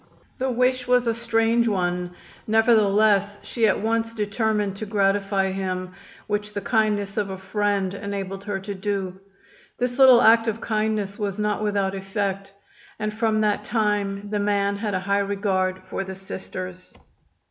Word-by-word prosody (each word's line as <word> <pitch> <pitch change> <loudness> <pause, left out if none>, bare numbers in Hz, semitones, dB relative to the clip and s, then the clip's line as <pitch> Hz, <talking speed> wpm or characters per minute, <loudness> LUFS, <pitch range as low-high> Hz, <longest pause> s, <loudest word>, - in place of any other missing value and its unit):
The 260 +1 0
wish 250 +1 +1
was 250 0 +3
a 230 - +2
strange 230 0 +1
one, 180 -3 -1 0.3
nevertheless 215 -2 +3
she 230 -2 +1
at 200 - +2
once 230 +1 -1
determined 210 -1 0
to 215 - -5
gratify 195 -1 +1
him, 185 -1 -3 0.3
which 210 0 -3
the - - 0
kindness 210 -2 0
of 205 -2 0
a 190 - -5
friend 200 -1 -1
enabled 195 -1 -5
her 205 -2 -2
to 200 +1 -5
do. 195 -1 -3 0.6
This 245 +1 -2
little 255 -2 +8
act 225 +1 +6
of 225 0 -1
kindness 215 -2 -1
was 200 -2 -2
not 210 0 -1
without 200 -2 0
effect, 195 0 -3 0.5
and 215 0 -3
from 215 0 +1
that 210 -1 +1
time 205 -2 -1
the 210 - 0
man 200 0 +1
had 205 -1 -2
a 185 - -1
high 200 +1 +1
regard 190 -2 -1
for - - -4
the 190 0 -7
Sisters. 185 -1 -8
205 Hz, 160 wpm, -24 LUFS, 195-220 Hz, 0.6 s, little